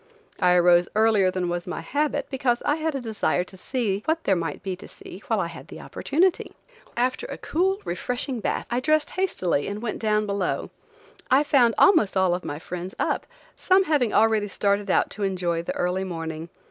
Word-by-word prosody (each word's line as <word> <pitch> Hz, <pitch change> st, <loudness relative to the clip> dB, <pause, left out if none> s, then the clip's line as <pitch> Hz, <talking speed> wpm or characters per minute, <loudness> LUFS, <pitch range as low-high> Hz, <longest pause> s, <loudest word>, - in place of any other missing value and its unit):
I 180 Hz, -1 st, +4 dB
arose 175 Hz, 0 st, +5 dB
earlier 215 Hz, -3 st, +4 dB
than 185 Hz, -1 st, -2 dB
was 175 Hz, 0 st, -3 dB
my 180 Hz, -, -4 dB
habit, 290 Hz, -, -1 dB
because 255 Hz, -3 st, 0 dB
I 295 Hz, -, +2 dB
had 315 Hz, -2 st, -2 dB
a -, -, -1 dB
desire 220 Hz, -5 st, 0 dB
to 185 Hz, -, -11 dB
see 205 Hz, -1 st, -2 dB
what 325 Hz, +1 st, 0 dB
there 195 Hz, -, +2 dB
might 165 Hz, 0 st, -4 dB
be 190 Hz, -2 st, -3 dB
to -, -, -11 dB
see 190 Hz, -, -12 dB
while 225 Hz, -3 st, +1 dB
I 180 Hz, -, 0 dB
had 170 Hz, 0 st, -9 dB
the -, -, -10 dB
opportunity. 350 Hz, +5 st, 0 dB, 0.4 s
After 255 Hz, -, 0 dB
a -, -, -6 dB
cool, 380 Hz, +4 st, 0 dB
refreshing 245 Hz, +7 st, -3 dB
bath, -, -, -2 dB
I 240 Hz, -, +1 dB
dressed 310 Hz, +3 st, +1 dB
hastily 185 Hz, -, 0 dB
and 205 Hz, +1 st, -4 dB
went 215 Hz, -1 st, -4 dB
down 215 Hz, -1 st, +1 dB
below. 200 Hz, -2 st, -2 dB, 0.6 s
I 265 Hz, +3 st, +5 dB
found 255 Hz, -6 st, +3 dB
almost 215 Hz, -, +5 dB
all 190 Hz, -2 st, +3 dB
of 180 Hz, -, -3 dB
my 145 Hz, -, -4 dB
friends 180 Hz, +3 st, -7 dB
up, -, -, -1 dB, 0.3 s
some 375 Hz, +1 st, +3 dB
having 290 Hz, -, +1 dB
already 220 Hz, -1 st, +3 dB
started 200 Hz, +1 st, 0 dB
out -, -, +2 dB
to 205 Hz, -, -6 dB
enjoy 180 Hz, -3 st, -1 dB
the 170 Hz, -, -4 dB
early 180 Hz, +2 st, 0 dB
morning. 165 Hz, -2 st, -5 dB
205 Hz, 195 wpm, -25 LUFS, 180-260 Hz, 0.6 s, arose